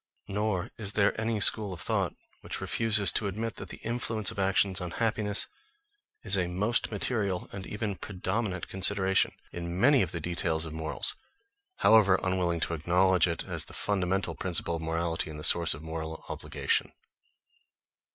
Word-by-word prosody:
Nor 100 -2 -2
is 105 -2 0
there 100 -1 +3
any 110 -1 -1
school 100 0 +3
of 85 - -9
thought - - -1 0.2
which - - -5
refuses 110 -3 +3
to 105 - -1
admit 110 +4 -4
that - - -8
the - - -7
influence 115 -2 -1
of 115 - -8
actions 95 0 +2
on 90 - -4
happiness 110 -2 +2 0.8
is 100 -2 +3
a 90 -2 +2
most 105 +7 0
material 100 -3 -1
and 95 -1 -7
even 105 -2 -4
predominant 95 0 -3
consideration 95 0 +2 0.2
in 85 +1 -5
many 140 +4 +5
of 90 - -1
the 85 - -3
details 85 -1 -1
of 80 - -7
morals, 80 0 +3 0.7
however 100 -4 +5
unwilling 90 -2 0
to 85 - -1
acknowledge 90 +2 +3
it 85 -1 -2
as - - -2
the - - -12
fundamental 95 -1 -1
principle 85 -2 -1
of - - -8
morality, 80 0 -2
and 75 -1 -8
the - - -8
source 85 -1 +4
of 75 - -11
moral 80 0 -6
obligation. - - -1
95 Hz, 165 wpm, -28 LUFS, 85-105 Hz, 0.8 s, many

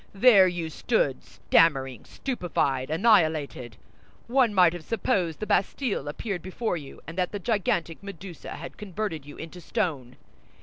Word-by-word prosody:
There 200 -3 +7
you 170 -3 -3
stood, 150 - 0
stammering, 135 -7 +2
stupefied, 160 - -2
annihilated. 155 - +2 0.5
One 250 -1 +3
might 180 -4 +5
have 175 -2 -7
supposed 180 -5 -1
the 215 - -3
Bastille 205 - 0
appeared 180 +5 -4
before 185 +3 -2
you, 145 -5 -9
and 165 +4 -6
that 180 -1 0
the 205 - -3
gigantic 180 -6 -1
Medusa 195 -3 -8
had - - -9
converted 190 -7 -4
you 145 - -10
into 165 +2 -9
stone. 140 - -2
175 Hz, 140 wpm, -26 LUFS, 155-205 Hz, 0.5 s, There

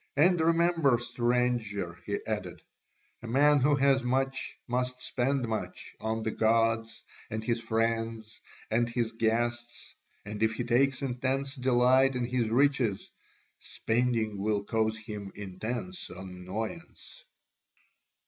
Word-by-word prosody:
And 175 +3 +4
remember, 165 -5 +3
stranger," 120 -7 -1
he - - 0
added, - - -4 0.6
"a 120 - -8
man 145 +5 +4
who 145 +3 +4
has 135 -1 +3
much 135 +2 -1
must 125 +1 -1
spend 130 0 -1
much 110 -1 -5
on 110 0 -2
the 110 - -1
gods 115 0 +1 0.3
and 110 0 -4
his 115 0 0
friends 115 -1 -2 0.3
and 120 +2 +2
his 115 -1 -1
guests, 120 +1 -2 0.3
and 105 0 -6
if 110 0 +2
he 120 - -2
takes 130 +3 +2
intense 135 +1 -1
delight 130 +1 +3
in 125 -1 0
his 120 -2 0
riches, 125 -4 +1 0.5
spending 115 -3 -1
will 105 0 0
cause 110 +1 0
him 105 -2 -7
intense 115 - -5
annoyance." 95 - -7
120 Hz, 120 wpm, -29 LUFS, 110-130 Hz, 0.6 s, And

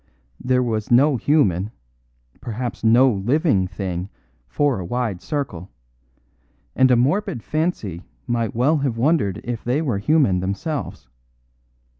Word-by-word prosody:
There 125 0 +2
was 110 -3 -2
no 135 +4 +5
human, 110 - +1 0.7
perhaps 120 0 -5
no 120 +4 +5
living, 105 - +1
thing 90 +1 -4 0.4
for 145 - 0
a - - -4
wide 110 -1 -3
circle; 130 - -4 1.1
and 130 - +4
a 125 - +5
morbid 125 - 0
fancy 155 - -2 0.2
might 115 -3 -2
well 140 +7 +3
have 135 -5 -1
wondered 125 - +1
if 120 -1 -4
they 125 +4 0
were 130 -11 -1
human 130 - +2
themselves. 100 - -4
120 Hz, 125 wpm, -21 LUFS, 100-140 Hz, 1.1 s, no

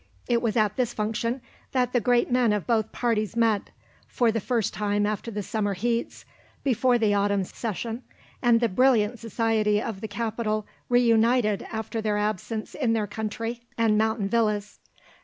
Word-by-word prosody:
It 235 -1 +2
was 230 -2 0
at 210 -1 +2
this 245 -2 0
function 225 +4 -1 0.3
that 250 -2 +1
the 245 - +4
great 245 +2 +2
men 245 -3 +3
of 205 -3 -2
both 220 -3 +1
parties 225 -3 -1
met, 225 -3 +2 0.4
for 240 -2 +2
the 225 - -1
first 230 -1 -1
time 205 0 0
after 215 +2 -2
the 210 -2 -4
summer 205 0 -1
heats, 235 +4 -2 0.4
before 250 -1 +3
the 215 -3 +2
autumn 200 -1 +2
session, 225 +4 -4 0.4
and 240 -2 +4
the 235 - +4
brilliant 235 0 +3
society 220 -2 +1
of 215 -3 -5
the 220 - -3
capital 215 -2 -2 0.2
reunited 230 -2 +3
after 225 0 -3
their 210 -1 0
absence 215 +1 -2
in 245 -6 0
their 220 -2 +1
country 225 +3 -4 0.2
and 225 -2 +3
mountain 220 -1 +1
villas. 210 -2 0
225 Hz, 165 wpm, -26 LUFS, 210-235 Hz, 0.4 s, the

